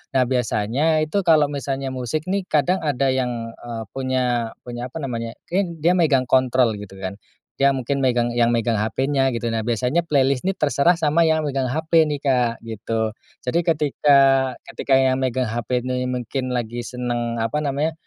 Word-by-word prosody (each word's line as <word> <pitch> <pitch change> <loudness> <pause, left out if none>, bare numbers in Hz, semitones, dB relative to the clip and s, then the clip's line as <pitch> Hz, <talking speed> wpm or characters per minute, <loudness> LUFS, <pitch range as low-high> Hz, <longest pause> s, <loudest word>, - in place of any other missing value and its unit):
Nah, 130 - +5
biasanya 125 +5 +1
itu 175 +6 0
kalau 155 -3 +5
misalnya 135 -1 -3
musik 130 +5 -3
nih, 195 0 -1
kadang 155 +5 +2
ada 140 -2 +1
yang, 120 -3 -2
eee, 115 -2 -6
punya 125 -3 -1
punya 120 0 -6
apa 125 - -8
namanya, 115 -3 -4 0.2
ken 175 -2 -1
dia 175 +2 +5
megang 145 -7 +3
kontrol, 130 -2 +3
gitu 100 -2 -10
kan. 95 +1 -5 0.4
Dia 140 0 +5
mungkin 135 +2 -2
megang 120 -2 +2
yang 120 -1 +4
megang 115 -1 +1
HP-nya, 135 +5 +1
gitu. 115 0 -2
Nah, 115 -1 -1
biasanya 125 +8 0
playlist 140 -2 +1
ini 195 - +1
terserah 150 +3 +3
sama 155 +2 +3
yang 160 0 +2
megang 135 -2 -1
HP 160 +3 +2
nih, 145 - -5
Kak, 125 -4 +1
gitu. 110 0 -2 0.3
Jadi 145 +7 +1
ketika 150 -3 +3 0.5
ketika 135 - -1
yang 130 0 +2
megang 130 -1 0
HP 120 +2 -1
nih 125 0 -1
mungkin 125 +1 -3
lagi 120 0 -3
senang 120 -1 -3
apa 115 +6 -1
namanya, 145 +3 -1
130 Hz, 175 wpm, -22 LUFS, 120-145 Hz, 0.5 s, Nah